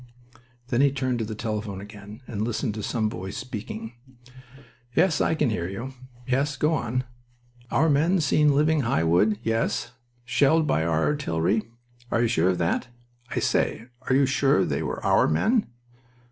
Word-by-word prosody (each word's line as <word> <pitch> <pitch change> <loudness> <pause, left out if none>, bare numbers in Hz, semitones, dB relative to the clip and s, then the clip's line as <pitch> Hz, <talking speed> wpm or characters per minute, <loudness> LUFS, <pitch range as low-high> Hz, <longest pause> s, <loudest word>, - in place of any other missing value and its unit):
Then 125 0 +2
he 140 -1 +4
turned 130 -2 -1
to 110 - -1
the 110 0 -5
telephone 105 -3 -4
again 105 +2 -11
and 105 -4 -5
listened 110 +1 -1
to 110 - -5
some 110 +1 -1
voice 95 -2 -5
speaking. 110 -2 -6 1.0
"Yes, 185 -5 +3
I - - +2
can 150 -6 +1
hear 85 -5 -2
you. 115 +8 -6 0.3
Yes, 135 +2 0
go 150 +4 +2
on. 125 -3 -1 0.7
'Our 160 - +2
men 160 +6 +3
seen 150 -1 +3
leaving 155 +1 +3
High 115 -10 +1
Wood.' 90 +6 +3
Yes. 115 +1 -1 0.3
'Shelled 145 +6 +3
by 80 - +1
our 80 -1 +1
artillery.' 110 - 0 0.4
Are 115 - +1
you - - +3
sure 95 -6 +2
of 90 - +1
that? 85 +6 0 0.4
I - - -5
say, 115 +3 0 0.2
are 130 - +4
you 140 +1 +5
sure 135 -5 +2
they - - -1
were - - -4
our - - +4
men? 220 - +2
120 Hz, 170 wpm, -25 LUFS, 105-140 Hz, 1.0 s, you